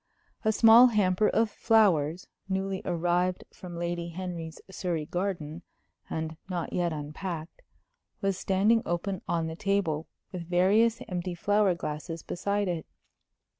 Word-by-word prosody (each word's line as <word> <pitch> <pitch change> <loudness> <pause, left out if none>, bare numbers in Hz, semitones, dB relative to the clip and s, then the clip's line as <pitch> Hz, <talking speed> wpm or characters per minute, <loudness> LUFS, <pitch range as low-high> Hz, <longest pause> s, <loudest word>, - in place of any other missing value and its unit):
A 220 - +3
small 225 +3 +8
hamper 210 -3 +2
of 225 -1 +2
flowers, 185 -9 +3 0.2
newly 190 0 -1
arrived 175 +1 0
from 175 -2 -9
Lady 170 0 -3
Henry's 170 -2 -6
Surrey 180 -5 -3
garden, 175 -3 -3 0.5
and 160 0 -4
not 175 -3 -3
yet 175 -1 +1
unpacked, 155 +3 -6 0.6
was 195 -2 0
standing 200 +5 +2
open 180 +2 -2
on 165 -1 0
the 160 0 -4
table, 180 -5 0 0.2
with 175 -2 -7
various 205 +6 +3
empty 180 -2 -3
flower 205 +1 +2
glasses 165 0 -5
beside 200 +2 -1
it. 170 -3 -3
180 Hz, 130 wpm, -28 LUFS, 165-200 Hz, 0.6 s, small